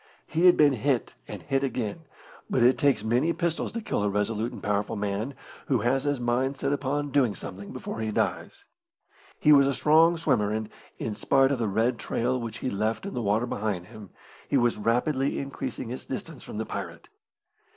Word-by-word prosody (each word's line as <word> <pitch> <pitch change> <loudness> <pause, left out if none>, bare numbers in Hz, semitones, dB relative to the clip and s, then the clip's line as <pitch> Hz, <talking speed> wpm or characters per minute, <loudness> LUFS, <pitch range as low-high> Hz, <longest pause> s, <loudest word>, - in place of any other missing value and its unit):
He 165 +4 +3
had 180 - +7
been 145 -2 +5
hit 130 0 0
and - - -8
hit 135 -1 0
again, 130 +4 -3 0.4
but 125 - +2
it 125 +2 +5
takes 140 -3 +3
many 125 +9 +2
pistols 170 0 -1
to 230 - -3
kill 210 - -2
a 105 - +1
resolute 105 +3 -1
and - - -10
powerful 105 +2 0
man 105 +6 -2 0.3
who 130 -6 +2
has 130 +4 +1
his 145 -2 0
mind 125 +3 0
set 140 +1 0
upon 145 +1 -2
doing 130 -8 +2
something 100 +3 -8
before - - -6
he 110 -1 -1
dies. 105 - -2 0.7
He 150 - +5
was 140 -2 +7
a 140 - 0
strong 165 +4 +5
swimmer, 105 -10 +1
and, 110 0 -2 0.3
in 110 - -3
spite 135 +6 +3
of 135 - 0
the 115 - 0
red 115 +4 +1
trail 125 +2 -1
which 115 -2 -5
he 130 - 0
left 110 - -1
in 200 - -5
the 120 - -2
water 105 +2 +1
behind 100 -5 -3
him, 110 -4 -11 0.4
he 140 - +3
was 120 -2 +2
rapidly 130 +5 +1
increasing 135 -3 -5
his 125 - -5
distance - - -6
from - - -8
the - - -2
pirate. - - -6
125 Hz, 200 wpm, -27 LUFS, 110-140 Hz, 0.7 s, had